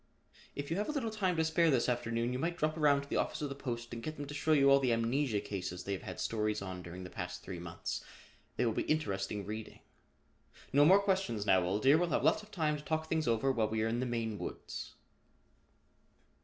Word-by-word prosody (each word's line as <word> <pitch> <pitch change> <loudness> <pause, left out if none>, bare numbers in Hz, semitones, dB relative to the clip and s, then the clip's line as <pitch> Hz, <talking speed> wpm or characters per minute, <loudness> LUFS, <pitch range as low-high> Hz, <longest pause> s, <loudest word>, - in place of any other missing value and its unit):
If 145 +2 -5
you 165 - 0
have 210 - -1
a - - +1
little 260 -7 -2
time 190 -5 0
to 160 - +3
spare 165 +1 +3
this 130 -5 +3
afternoon 120 0 0
you 125 - -2
might 170 +4 -1
drop 155 -1 0
around 145 -3 +3
to - - -13
the - - -1
office - - -1
of 145 - -1
the - - -3
Post 120 -4 -5
and 115 - -5
get 155 +5 -5
them 145 - -4
to 145 - -7
show 150 +2 0
you 140 -2 +6
all 140 - +7
the 130 -3 +1
amnesia 115 0 +1
cases 90 -3 -5
they 100 - -2
have 95 - -4
had - - -7
stories 105 -1 0
on 95 -2 -6
during 90 +1 -8
the 90 - -8
past - - -5
three 90 -2 -6
months. 85 -1 -5 0.5
They - - +1
will 115 - +1
be - - 0
interesting 100 -9 -1
reading. 110 +2 -7 0.9
No 145 +1 +6
more 190 +5 +8
questions 190 - 0
now, 95 -2 +5
old 95 +4 -1
dear, 140 +4 +6
we'll 175 0 +1
have - - +1
lots - - +4
of 210 - -15
time 155 -6 0
to 150 - -10
talk 160 0 -2
things 160 -1 0
over 115 +4 +2
while 115 -4 +1
we 110 0 0
are - - +1
in 115 +1 0
the 130 - -1
Maine 115 -3 -2
woods." - - -6
130 Hz, 245 wpm, -33 LUFS, 110-155 Hz, 0.9 s, more